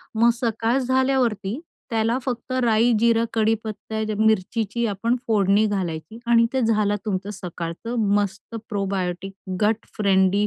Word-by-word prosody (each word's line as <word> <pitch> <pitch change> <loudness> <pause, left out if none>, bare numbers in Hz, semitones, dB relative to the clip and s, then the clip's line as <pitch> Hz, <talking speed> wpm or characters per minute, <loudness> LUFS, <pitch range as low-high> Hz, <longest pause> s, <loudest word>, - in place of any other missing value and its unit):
मग 230 +2 +5
सकाळ 230 0 0
झाल्यावरती, 260 -4 +1 0.3
त्याला 225 +1 +1
फक्त 250 -1 -4
राई, 230 +1 +4
जीरा, 230 0 +3
कढीपत्ता, 220 -1 -1 0.2
मिरचीची 220 +2 +1
आपण 225 +4 0
फोडणी 205 -1 +3
घालायची 190 +1 -4
आणि 230 -1 +5
ते 265 - +1
झालं 215 -3 +2
तुमचं 195 -1 -2
सकाळचं 175 +5 -5 0.2
मस्त 205 +2 -2
प्रोबायोटिक 195 -2 -2 0.3
गट 215 +1 +1
फ्रेंडली 195 0 +3
220 Hz, 120 wpm, -23 LUFS, 195-230 Hz, 0.3 s, मग